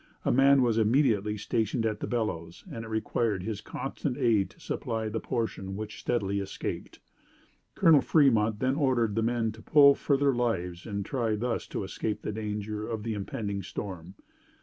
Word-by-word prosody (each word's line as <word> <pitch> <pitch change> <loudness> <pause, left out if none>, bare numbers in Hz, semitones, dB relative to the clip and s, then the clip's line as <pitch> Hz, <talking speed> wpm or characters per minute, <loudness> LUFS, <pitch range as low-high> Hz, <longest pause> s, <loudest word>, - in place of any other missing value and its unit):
A - - +3
man 135 +1 +5
was 115 -2 +2
immediately 110 -3 +2
stationed 110 +2 -1
at 105 -1 -1
the - - -4
bellows 85 -8 -3
and 115 - -5
it - - -8
required 110 -2 -1
his 105 -1 -4
constant 135 +2 -4
aid 115 -7 +2
to - - -21
supply 110 -1 -3
the 110 +1 -2
portion 110 -6 -3
which 105 +1 -6
steadily 100 -4 -1
escaped. 100 -1 -5 0.8
Colonel 165 -6 +6
Fremont 115 -9 +3
then 130 +1 +2
ordered 130 -7 +1
the 115 - 0
men 115 -1 0
to 110 +1 -13
pull 140 +1 +7
for 140 0 +1
their 140 0 +3
lives 95 -8 -2
and 100 -2 -3
try 115 -5 0
thus 120 +3 -2
to - - -4
escape 105 +2 -3
the - - -2
danger 105 0 -4
of 110 -2 -3
the 115 0 -2
impending 100 0 -4
storm. 95 -1 -7
110 Hz, 175 wpm, -28 LUFS, 105-120 Hz, 0.8 s, pull